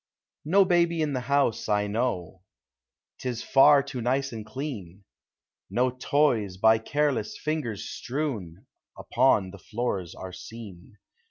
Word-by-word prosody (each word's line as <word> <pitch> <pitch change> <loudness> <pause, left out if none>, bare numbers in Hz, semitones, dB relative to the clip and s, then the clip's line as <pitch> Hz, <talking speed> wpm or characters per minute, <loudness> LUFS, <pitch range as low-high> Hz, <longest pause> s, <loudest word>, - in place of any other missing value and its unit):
No 195 +5 +5
baby 170 -2 +2
in 150 -2 -1
the 130 - 0
house, 135 -4 0
I 105 0 +2
know, 100 -5 -2 0.8
'T 130 - -3
is 120 -2 -4
far 140 +1 +6
too 135 -3 -6
nice 135 +3 0
and 110 -2 -6
clean. 105 - -7 0.7
No 125 +1 +1
toys, 125 -7 +1
by 110 +3 +5
careless 140 -2 -1
lingers 150 -10 -2
strewn, 120 - -4 0.3
Upon 95 -2 +2
the 100 - -11
floors 100 -4 -3
are 95 -1 -8
seen. 105 0 -11
120 Hz, 135 wpm, -27 LUFS, 100-140 Hz, 0.8 s, far